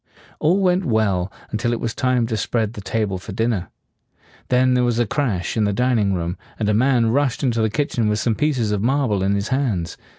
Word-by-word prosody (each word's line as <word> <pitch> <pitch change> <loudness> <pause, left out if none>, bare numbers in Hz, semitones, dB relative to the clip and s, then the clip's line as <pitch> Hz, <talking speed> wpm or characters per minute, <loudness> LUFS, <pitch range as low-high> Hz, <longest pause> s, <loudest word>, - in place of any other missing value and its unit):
All 175 +6 +3
went 185 -1 +2
well 100 - +1 0.2
until 115 +2 -1
it 115 - -2
was 115 - -2
time 125 -2 +1
to 115 -1 -2
spread 110 +1 -1
the 105 - -8
table 100 -2 -2
for 95 +2 -8
dinner. 110 -3 -1 0.8
Then 125 0 +3
there 125 0 +2
was 120 -2 +1
a 120 - +2
crash 110 -7 -1
in 110 -2 +2
the 100 - 0
dining 115 -4 +1
room, 85 +1 -3 0.2
and 110 - -1
a 105 - +2
man 120 0 +3
rushed 140 +1 0
into 120 -4 +1
the 110 - +2
kitchen 115 -2 0
with 105 - +1
some 115 +1 +1
pieces 125 -5 0
of 105 -2 0
marble 125 -4 +1
in 100 +1 +1
his 100 +1 -2
hands. 120 -11 -1
115 Hz, 220 wpm, -21 LUFS, 105-125 Hz, 0.8 s, All